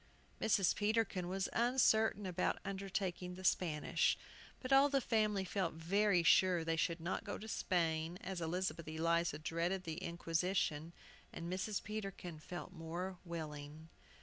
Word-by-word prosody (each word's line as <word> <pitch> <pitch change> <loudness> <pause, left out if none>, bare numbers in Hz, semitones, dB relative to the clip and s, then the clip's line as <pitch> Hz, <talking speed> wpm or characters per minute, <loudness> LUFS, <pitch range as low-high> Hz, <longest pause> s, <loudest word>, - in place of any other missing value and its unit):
Mrs. 200 -4 +3
Peterkin 210 -4 +1
was 190 +1 -1
uncertain 225 -4 +3
about 180 -1 0
undertaking 190 -2 -3
the 185 - -9
Spanish, 160 -5 +2 0.4
but 260 +1 -1
all 275 +1 +7
the 275 -1 +3
family 215 -5 +1
felt 185 -3 -1
very 180 +2 +2
sure 180 0 +5
they 165 0 0
should 165 +1 0
not 170 +3 -2
go - - -4
to 220 - -8
Spain 165 -4 0
(as 185 -2 -4
Elizabeth 170 0 -2
Eliza 165 0 +1
dreaded 170 +4 -1
the 160 -2 -4
Inquisition), 170 -1 -1 0.4
and 170 +2 -5
Mrs. 190 +2 -2
Peterkin 195 -6 -5
felt 175 +3 -7
more 175 +2 -5
willing. 155 -2 -7
180 Hz, 140 wpm, -37 LUFS, 165-195 Hz, 0.4 s, all